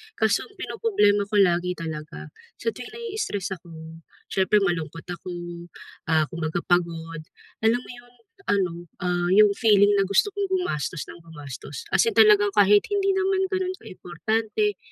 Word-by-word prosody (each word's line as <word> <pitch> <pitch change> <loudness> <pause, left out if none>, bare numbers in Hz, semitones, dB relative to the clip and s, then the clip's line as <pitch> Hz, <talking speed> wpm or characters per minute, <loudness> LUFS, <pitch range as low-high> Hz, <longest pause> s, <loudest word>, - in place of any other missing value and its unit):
Kaso - - +1
ang 405 - -23
pinoproblema 210 - +1
ko 210 - -4
lagi 180 -1 +2
talaga, 160 -1 -7 0.3
sa - - -1
tuwing 435 - -10
na-i-stress 435 - -4
ako, 170 - -18 0.6
siyempre 195 +2 +3
malungkot 165 -3 -2
ako, 180 +1 -6 0.8
ah, 160 -1 +4
kumbaga 165 0 -3
pagod, 165 -2 -1 0.4
alam 225 +2 +3
mo - - -11
'yong 245 0 -18 0.3
ano, 190 -4 +1 0.3
ah, 175 -1 0
'yong 210 +1 +6
feeling 205 -3 +5
na 195 - +3
gusto 200 - +3
kong 405 -1 0
gumastos 180 - -2
nang - - -10
gumastos? 150 - -9
As - - +4
in 455 - 0
talagang 420 -1 +5
kahit 205 +1 +5
hindi 400 -1 0
naman 385 0 +1
gano'n 375 -1 -1
ka-importante, 220 - -2
200 Hz, 150 wpm, -24 LUFS, -, 0.8 s, yong